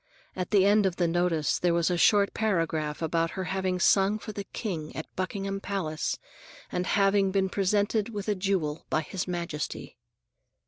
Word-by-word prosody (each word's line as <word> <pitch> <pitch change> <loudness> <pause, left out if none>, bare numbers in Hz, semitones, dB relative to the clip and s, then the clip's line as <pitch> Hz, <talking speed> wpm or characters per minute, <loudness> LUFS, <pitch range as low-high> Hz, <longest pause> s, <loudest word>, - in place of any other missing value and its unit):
At 185 -1 -3
the 195 -3 +4
end 205 0 +5
of 180 - -2
the 175 -1 +1
notice, 165 -2 +1
there 175 -1 +2
was 170 +1 +2
a - - +2
short 200 +3 +4
paragraph 165 -7 -1
about 165 +1 +1
her 190 - -1
having 185 0 -1
sung 195 +3 +4
for 215 - -7
the 200 -1 -6
King 170 -11 -5
at 155 - -4
Buckingham 195 +1 -3
Palace 170 -7 -2 0.5
and 180 +1 -1
having 195 -1 +3
been 190 0 +1
presented 205 +3 +1
with 205 -3 -5
a 210 - +2
jewel 185 -6 -1
by 155 - +1
His 190 +4 -4
Majesty. 170 -4 -4
185 Hz, 175 wpm, -28 LUFS, 170-200 Hz, 0.5 s, end